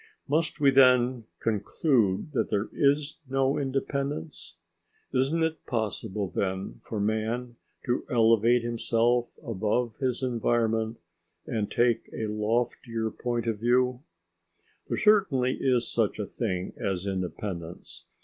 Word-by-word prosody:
Must 155 +2 0
we 140 -2 +5
then 125 -2 +5
conclude 110 - +1
that 115 -6 0
there 105 +1 -1
is 145 +1 +2
no 135 +2 +1
independence? 135 - -3 0.6
Isn't 135 +6 +2
it 160 0 -2
possible 105 -3 -2
then 95 -9 -3
for 110 - -4
man 110 +3 -1 0.3
to 125 -1 0
elevate 115 0 +4
himself 120 +1 +1
above 110 +1 -1
his 130 -1 -1
environment 115 -2 0 0.5
and 105 -2 -2
take 120 -1 +1
a 110 - -3
loftier 110 +1 -1
point 120 0 -2
of 110 -3 -1
view? 125 +2 +2 0.9
There - - -2
certainly 170 -12 +3
is 125 -3 +2
such 110 -3 0
a 105 - -2
thing 95 -5 -3
as 95 -1 -2
independence. 95 -2 -5
120 Hz, 120 wpm, -27 LUFS, 110-130 Hz, 0.9 s, we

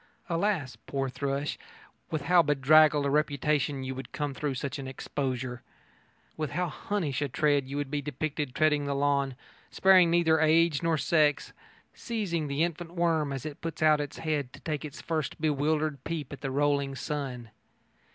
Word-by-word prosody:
Alas, 170 -6 0
poor 135 -1 -1
thrush, 140 +2 -3 0.5
with 155 -3 -2
how 175 +3 +5
bedraggled 150 0 +5
a - - +1
reputation 145 -1 +1
you 130 0 -3
would 130 +1 -8
come 145 -2 -3
through 140 0 -2
such 140 +2 -4
an 135 - -6
exposure! 130 -2 -4 0.7
With 155 -2 -3
how 180 +2 0
Hunnish 150 -2 -2
a 145 - -1
tread 145 0 +1
you 140 +1 -5
would 145 -1 -3
be 145 -1 -1
depicted 145 -1 -3
treading 150 -2 +2
the 140 0 -1
lawn, 140 -1 +1 0.3
sparing 185 -2 +5
neither 165 -2 +3
age 160 -1 +4
nor 165 -2 +1
sex, 150 -1 +2 0.4
seizing 185 -9 -2
the 140 +3 0
infant 170 0 -4
worm 165 -4 +1
as 135 -2 -5
it 150 -2 -7
puts 165 -1 -4
out 155 -1 +5
its 145 - -6
head 150 -5 -2
to - - -11
take 150 -3 -3
its 150 -3 -8
first 160 0 -2
bewildered 150 -1 0
peep 155 -4 -4
at 140 - -9
the 135 - -2
rolling 140 0 +1
sun! 130 -6 -4
145 Hz, 170 wpm, -29 LUFS, 140-160 Hz, 0.7 s, how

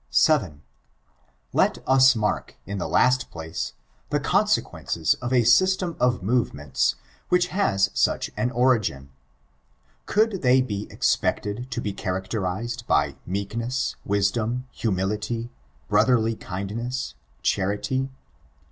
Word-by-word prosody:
7. 95 - +2 0.9
Let - - +3
us 130 -1 +6
mark, 105 -2 -2
in 100 0 -4
the - - -2
last 125 0 +3
place, 80 0 -5 0.4
the - - +1
consequences 80 -2 +1
of 125 0 -3
a 125 -2 +4
system 180 +7 +3
of 125 -5 +1
movements, 75 - 0 0.3
which 180 0 +3
has 100 - +1
such - - +1
an 110 +4 0
origin. 115 - +1 1.0
Could 215 -2 +2
they 130 0 +5
be 105 -5 -2
expected 110 +5 0
to 120 - -3
be 105 -4 -3
characterized 95 +5 -3
by - - +2
meekness, 115 +7 -2
wisdom, 110 +5 0
humitity, 110 +3 -2 0.4
brotherly 110 +2 +3
kindness, 115 +8 -4 0.3
charity? 105 +8 0
115 Hz, 110 wpm, -24 LUFS, 100-125 Hz, 1.0 s, us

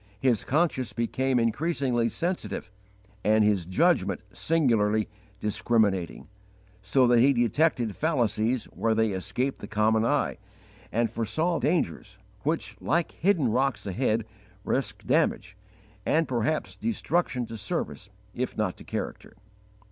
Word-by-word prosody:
His 120 -5 +2
conscience 145 -4 0
became 125 +2 0
increasingly 120 -1 +1
sensitive 175 - -3 0.5
and 110 +1 +4
his 100 -5 +2
judgment 90 - +2
singularly 110 -9 +2 0.3
discriminating, 105 -4 0 0.5
so 125 +7 +3
that 120 -1 +5
he 135 +4 +5
detected 120 -1 +1
fallacies 125 -6 +1
where 115 -1 +1
they 110 -1 +2
escape 100 +8 -2
the 100 - -7
common 110 +1 +2
eye, 115 - 0 0.5
and 115 +1 +2
foresaw 160 - 0
dangers 140 - -1 0.2
which, - - -2
like 170 +3 +1
hidden 170 - +2
rocks 135 +3 0
ahead, 110 +2 0 0.4
risk - - -2
damage 100 - +1 0.5
and, 160 +7 +2
perhaps, 125 +5 -1
destruction 175 - -1
to 115 - -8
service 100 -2 -4 0.2
if - - -3
not - - -1
to - - -12
character. - - -5
120 Hz, 120 wpm, -27 LUFS, 110-140 Hz, 0.5 s, that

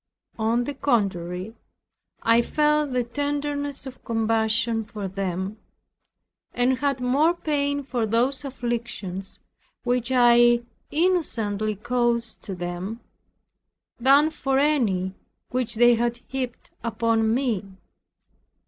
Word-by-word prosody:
On 230 +2 +2
the 290 - -4
contrary, 195 -7 -1 0.7
I 230 +1 +5
felt 300 +2 +1
the 250 -1 +1
tenderness 285 +2 -3
of 260 -1 -10
compassion 225 0 +1
for 210 -2 -6
them, 190 +2 -3 1.0
and 250 +1 +2
had 275 -2 0
more 285 +7 +3
pain 285 -3 -1
for 245 -4 -1
those 250 +5 +1
afflictions 235 -7 -4 0.5
which 245 0 0
I 240 -1 +5 0.3
innocently 225 - 0
caused 235 +1 -1
to 195 - -5
them, 175 +5 -5 1.0
than 280 +5 +5
for 270 -3 0
any 225 -11 +2 0.4
which 245 -2 0
they 240 +2 +6
had 235 +1 0
heaped 255 -3 -5
upon 230 -1 +1
me. 220 -7 -1
240 Hz, 105 wpm, -25 LUFS, 220-270 Hz, 1.0 s, they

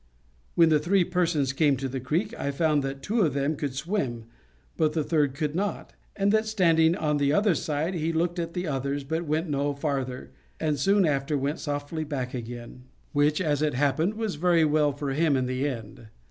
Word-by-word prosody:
When 165 -1 +6
the 155 -1 +4
three 180 +5 +3
persons 170 -7 0
came 145 -1 +3
to 135 +1 -3
the 130 0 -4
creek, 170 - -1
I - - -3
found 150 +1 +1
that 135 0 -5
two 220 +7 +1
of 155 -8 +1
them 140 +2 0
could 140 -2 -4
swim, 135 - -2 0.5
but 155 -1 +1
the 155 - 0
third 145 -4 +1
could 150 0 -2
not, 200 +4 -3 0.2
and 200 0 +2
that, 220 +1 +2
standing 165 -6 +3
on 150 -5 0
the 140 -1 +2
other 200 +4 +3
side, 155 +3 -2
he 165 -2 -1
looked 170 +2 0
at 170 +1 -4
the 180 0 -2
others, 140 -1 -2
but 160 +4 -3
went 155 +3 0
no 145 -1 -1
farther, 135 -3 -3 0.3
and 150 -3 0
soon 195 +6 +3
after 145 0 0
went 140 +3 -2
softly 145 +2 -3
back 135 -4 -4
again; 120 +1 -7 0.3
which, 145 +2 +2
as 150 -5 0
it 150 -3 +1
happened, 150 +9 +1
was 215 -7 -3
very 175 -3 +4
well 150 -1 +3
for 140 0 -4
him 150 0 +2
in 130 - 0
the 130 +3 -1
end. 115 -3 -8
150 Hz, 205 wpm, -26 LUFS, 140-170 Hz, 0.5 s, When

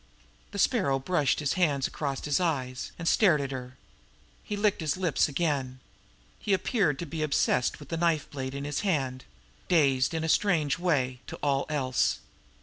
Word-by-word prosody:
The - - -8
Sparrow 190 - +2
brushed 140 0 +1
his 145 -2 0
hands 150 -7 +1
across 140 -3 -3
his 145 -2 +1
eyes, 130 -7 -2
and 165 - -5
stared 175 -7 +4
at 140 -1 -3
her. 130 -1 -7 0.7
He 205 - -4
licked 205 -3 +1
his 155 +1 -1
lips 180 -5 +2
again. 140 -4 -1 0.6
He 205 - 0
appeared 190 - +1
to 170 - -4
be 160 0 -5
obsessed 140 -4 +1
with 145 - -12
the 165 - -2
knife 165 -2 +1
blade 130 -1 -5
in 140 - -4
his 145 -1 -2
hand 135 -10 -1 0.4
dazed 140 -3 +3
in 160 - -1
a - - -1
strange 160 -4 +2
way 135 -8 0
to - - -6
all 140 -1 +1
else. 130 -4 +1
145 Hz, 175 wpm, -28 LUFS, 135-170 Hz, 0.7 s, stared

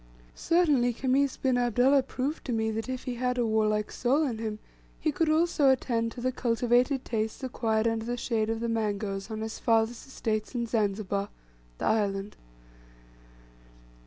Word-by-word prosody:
Certainly 295 -8 +2
Khamis 265 +3 +1
bin 255 -2 +1
Abdullah 245 +3 +4
proved 265 +3 -3
to 260 - -3
me 220 -1 0
that 225 +3 -4
if 255 -1 -4
he 250 - -3
had 250 +1 -1
a 240 - +2
warlike 215 -1 +1
soul 270 +5 +1
in 235 -5 -3
him, 215 -2 -3 0.4
he 310 - +1
could 315 +2 0
also 310 -3 +3
attend 235 -3 +1
to 245 - -8
the 255 +1 0
cultivated 245 +2 +1
tastes 220 +2 -2
acquired 225 -3 0
under 225 -1 -1
the 240 +1 -2
shade 225 -3 -1
of 225 0 -2
the 235 - -1
mangoes 205 -3 -2
on 220 -1 -4
his 220 0 -5
father's 225 +2 +1
estates 220 -3 -3
in 235 -1 0
Zanzibar 205 -3 -1 0.5
the - - -3
island. 205 -2 0
235 Hz, 165 wpm, -28 LUFS, 220-255 Hz, 0.5 s, Abdullah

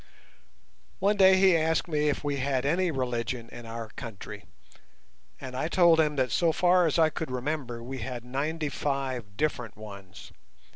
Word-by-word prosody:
One 200 +2 +2
day 190 -1 +6
he 190 -2 +5
asked 160 +1 +1
me 150 -2 +1
if 145 - -2
we 145 -1 -1
had 135 -1 -1
any 175 +5 +2
religion 125 -4 -3
in 120 -1 -10
our 115 -1 -6
country, 115 -3 -9 0.9
and 130 -2 -7
I 135 +4 -1
told 170 -2 +5
him 150 -2 +2
that 130 -2 0
so 170 -2 +3
far 180 +1 +4
as 155 - 0
I 160 -1 +4
could 160 0 -4
remember 125 -2 -3
we 130 +2 -6
had 120 0 -5
ninety 150 +4 -2
five 130 -7 -3
different 125 -8 -2
ones. 100 -4 -11
140 Hz, 165 wpm, -28 LUFS, 120-160 Hz, 0.9 s, day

